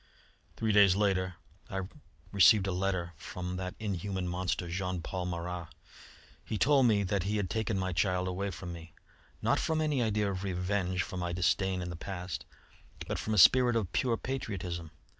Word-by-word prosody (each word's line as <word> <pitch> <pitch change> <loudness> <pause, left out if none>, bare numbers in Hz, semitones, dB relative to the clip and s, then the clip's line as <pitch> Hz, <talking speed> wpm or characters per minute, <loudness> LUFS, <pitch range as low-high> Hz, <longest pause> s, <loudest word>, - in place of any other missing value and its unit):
"Three 110 -1 +1
days 100 -3 +6
later 95 -3 +1 0.3
I 95 - -2 0.5
received 100 +1 +6
a 95 - -1
letter 90 -2 -1
from 90 +2 -5
that 90 0 -4
inhuman 95 -3 -3
monster, 90 0 -2
Jean 90 0 -3
Paul 90 +1 -3
Marat. 85 0 -4 0.8
He 110 - -3
told 135 +1 +5
me 105 -3 +3
that 100 0 0
he 100 +4 -1
had 95 -4 -2
taken 110 -2 -1
my 95 -1 -1
child 90 +3 +1
away 95 +2 -2
from 90 -1 -6
me, 85 -1 -11 0.5
not - - +3
from 160 -1 0
any 150 -4 +1
idea 105 -3 +1
of 95 0 -4
revenge 90 -1 -1
for 95 - -7
my 90 -1 -2
disdain 90 +1 +1
in 90 - -5
the - - -5
past, 90 +1 -5 0.6
but - - -2
from 110 - -1
a - - -1
spirit 120 +5 +7
of 105 -6 -1
pure 120 -3 +1
patriotism. 90 -11 -4
95 Hz, 180 wpm, -31 LUFS, 90-105 Hz, 0.8 s, spirit